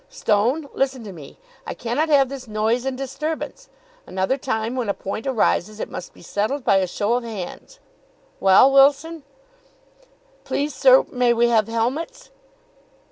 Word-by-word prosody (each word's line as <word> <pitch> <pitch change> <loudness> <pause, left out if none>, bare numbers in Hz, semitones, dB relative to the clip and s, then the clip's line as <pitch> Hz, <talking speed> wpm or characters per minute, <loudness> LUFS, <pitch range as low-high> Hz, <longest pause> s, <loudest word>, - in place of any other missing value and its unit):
Stone, 255 - 0
listen 265 -3 -1
to 200 -3 -8
me. 155 -5 -12 0.3
I - - -5
cannot 250 +7 -1
have 280 -3 +4
this 265 -1 -8
noise 220 +3 0
and 265 -1 -2
disturbance! 305 - -5 0.4
Another 190 +7 -1
time 235 -3 -3
when 245 -5 -2
a 200 - 0
point 215 +6 -5
arises 215 -4 0
it - - -5
must 180 - -7
be - - -18
settled 215 - -2
by 200 - +3
a 190 -1 +1
show 205 +5 -1
of 245 0 0
hands. 225 - -8 0.6
Well, 195 +8 +6
Wilson?" 285 +4 +3 1.2
"Please, 290 0 -2
sir, 260 0 +5
may 245 -2 +2
we 235 +1 +3
have 220 -3 +2
helmets?" 255 - -3
245 Hz, 155 wpm, -22 LUFS, 215-275 Hz, 1.2 s, Well